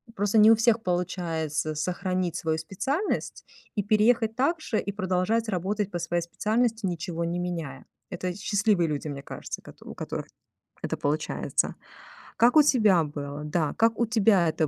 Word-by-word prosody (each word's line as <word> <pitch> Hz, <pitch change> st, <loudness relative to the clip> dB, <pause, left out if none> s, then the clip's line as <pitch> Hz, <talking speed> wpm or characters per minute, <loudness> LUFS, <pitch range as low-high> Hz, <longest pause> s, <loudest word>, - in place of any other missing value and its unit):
просто 205 Hz, +2 st, +1 dB
не 215 Hz, +1 st, +8 dB
у -, -, +7 dB
всех 225 Hz, 0 st, +3 dB
получается 165 Hz, -4 st, -2 dB
сохранить 180 Hz, +2 st, -2 dB
свою 160 Hz, -2 st, -1 dB
специальность 265 Hz, -, -3 dB, 0.3 s
и 205 Hz, -, 0 dB
переехать 220 Hz, +2 st, +3 dB
также, 280 Hz, -4 st, 0 dB
и 200 Hz, -, -4 dB
продолжать 190 Hz, +3 st, 0 dB
работать 200 Hz, +2 st, -1 dB
по 175 Hz, -, -3 dB
своей 175 Hz, 0 st, -1 dB
специальности, 220 Hz, +4 st, 0 dB
ничего 170 Hz, -1 st, -3 dB
не 170 Hz, +1 st, -2 dB
меняя. 165 Hz, -7 st, -5 dB, 0.2 s
Это 180 Hz, -1 st, -3 dB
счастливые 200 Hz, -3 st, +1 dB
люди, 150 Hz, +1 st, -3 dB
мне 140 Hz, -1 st, -5 dB
кажется, -, -, -7 dB
кото -, -, -15 dB
у -, -, -8 dB
которых -, -, -5 dB, 0.6 s
это -, -, -2 dB
получается. 150 Hz, +2 st, -1 dB, 0.6 s
Как 245 Hz, +6 st, +5 dB
у 300 Hz, -, +9 dB
тебя 215 Hz, -, +4 dB
было? 145 Hz, 0 st, -6 dB
Да, 155 Hz, -1 st, 0 dB
как 225 Hz, 0 st, +3 dB
у 235 Hz, -, +3 dB
тебя 200 Hz, -7 st, +4 dB
это 155 Hz, -1 st, 0 dB
185 Hz, 160 wpm, -27 LUFS, 165-220 Hz, 0.6 s, у